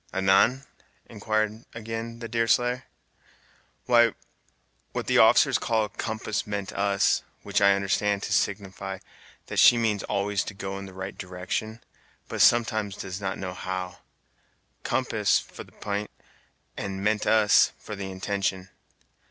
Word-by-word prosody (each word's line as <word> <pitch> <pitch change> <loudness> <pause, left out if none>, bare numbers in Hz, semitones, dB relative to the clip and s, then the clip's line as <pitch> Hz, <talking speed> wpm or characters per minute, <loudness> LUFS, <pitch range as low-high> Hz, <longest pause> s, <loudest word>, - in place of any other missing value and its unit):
"Anan?" 95 +8 +3 0.4
inquired, 110 +1 -2
again, 115 +1 -5
the 115 - -4
Deerslayer. 120 +2 +1 1.0
"Why, 120 -2 +4 0.8
what - - -3
the - - +3
officers - - +5
call 110 -2 0
'compass 110 -1 -3
meant 100 -2 -4
us,' 100 -1 +2 0.2
which - - 0
I 100 0 +6
understand 100 +1 0
to 95 - -2
signify 95 -1 -2 0.5
that - - -2
she 120 - +8
means 110 -4 0
always 100 0 -1
to 100 - -7
go 95 0 -5
in 100 - -8
the 95 - -12
right 95 +1 -6
direction, 95 +5 -5 0.4
but - - -3
sometimes 110 -4 +3
does 95 +1 -6
not 95 0 -3
know 95 -1 -5
how. 95 +1 -5 0.8
'Compass'for - - 0
the - - -20
p'int, 105 0 -4 0.7
and 95 0 -5
'meant 105 0 +1
us' 110 -2 +5
for 105 - -8
the 95 -1 -5
intention. 95 0 -2
100 Hz, 135 wpm, -26 LUFS, 95-110 Hz, 1.0 s, she